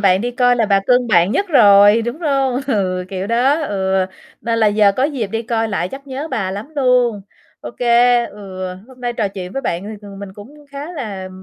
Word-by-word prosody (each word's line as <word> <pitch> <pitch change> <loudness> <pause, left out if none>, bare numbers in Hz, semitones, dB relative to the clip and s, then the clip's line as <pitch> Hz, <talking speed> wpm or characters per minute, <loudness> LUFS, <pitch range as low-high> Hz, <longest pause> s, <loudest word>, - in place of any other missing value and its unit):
bạn 190 -2 +3
đi 240 +3 -2
coi 245 0 +2
là 225 -2 +1
bà 200 -1 +3
cưng 250 0 +3
bạn 185 -1 +3
nhất 400 - 0
rồi, 205 - +6
đúng 240 +7 -5
hông? 275 -5 0
Ừ, 185 -7 -1
kiểu 190 0 -4
đó, 255 +7 +2
ừ, 190 -6 0 0.3
nên 230 -1 -1
là 220 - +3
giờ 205 -1 +4
có 260 - +2
dịp 275 -7 -2
đi 225 +4 -4
coi 225 -1 -1
lại 185 -4 -2
chắc 275 +6 -10
nhớ 275 +4 -5
bà 190 -9 -2
lắm 205 +7 -6
luôn. 250 -5 +2 0.4
Ô - - -7
kê, 240 0 +3
ừ, 190 -2 -8 0.2
hôm 255 -1 -17
nay 245 -1 -2
trò 215 -4 -1
chuyện 185 -2 -8
với 270 - -4
bạn 170 +2 -2
thì, 210 - -7 0.2
ừm, 195 -1 -11
mình 200 -1 -8
cũng 210 +8 -13 0.2
khá 285 +5 -7
là 200 - -6
225 Hz, 225 wpm, -18 LUFS, 200-250 Hz, 0.4 s, rồi